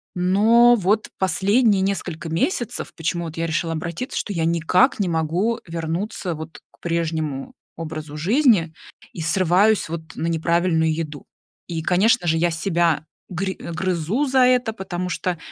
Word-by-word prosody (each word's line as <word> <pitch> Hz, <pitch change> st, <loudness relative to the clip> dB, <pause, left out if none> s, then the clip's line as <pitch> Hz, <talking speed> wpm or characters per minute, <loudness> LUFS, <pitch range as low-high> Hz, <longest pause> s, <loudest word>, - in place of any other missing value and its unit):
Но 220 Hz, +7 st, +5 dB
вот 210 Hz, +1 st, 0 dB
последние 200 Hz, +3 st, +2 dB
несколько 180 Hz, -4 st, -3 dB
месяцев, 240 Hz, -, -1 dB
почему 170 Hz, +1 st, -2 dB
вот 160 Hz, -1 st, -8 dB
я 165 Hz, 0 st, -1 dB
решила 165 Hz, 0 st, -1 dB
обратиться, 170 Hz, +9 st, -4 dB
что 205 Hz, -, -3 dB
я 165 Hz, -3 st, 0 dB
никак 170 Hz, -, +2 dB
не 200 Hz, -, +1 dB
могу 170 Hz, +8 st, 0 dB
вернуться 170 Hz, +2 st, -3 dB
вот 160 Hz, +1 st, -9 dB
к -, -, -28 dB
прежнему 160 Hz, -5 st, -2 dB, 0.2 s
образу 155 Hz, -2 st, -6 dB
жизни 200 Hz, -, +3 dB, 0.4 s
и 170 Hz, -, -6 dB
срываюсь 185 Hz, +4 st, +2 dB
вот 160 Hz, -1 st, -7 dB
на 165 Hz, -, -2 dB
неправильную 165 Hz, 0 st, +1 dB
еду. 155 Hz, -2 st, -5 dB, 0.4 s
И 165 Hz, -2 st, -3 dB
конечно 195 Hz, +4 st, +2 dB
же 160 Hz, 0 st, +2 dB
я 175 Hz, +2 st, +2 dB
себя 165 Hz, -2 st, 0 dB, 0.2 s
гри 190 Hz, +2 st, -2 dB
грызу 180 Hz, -, -2 dB
за 265 Hz, -1 st, +2 dB
это, 250 Hz, -2 st, +2 dB
потому 180 Hz, -3 st, -4 dB
что, 180 Hz, 0 st, -2 dB
175 Hz, 145 wpm, -22 LUFS, 165-200 Hz, 0.4 s, Но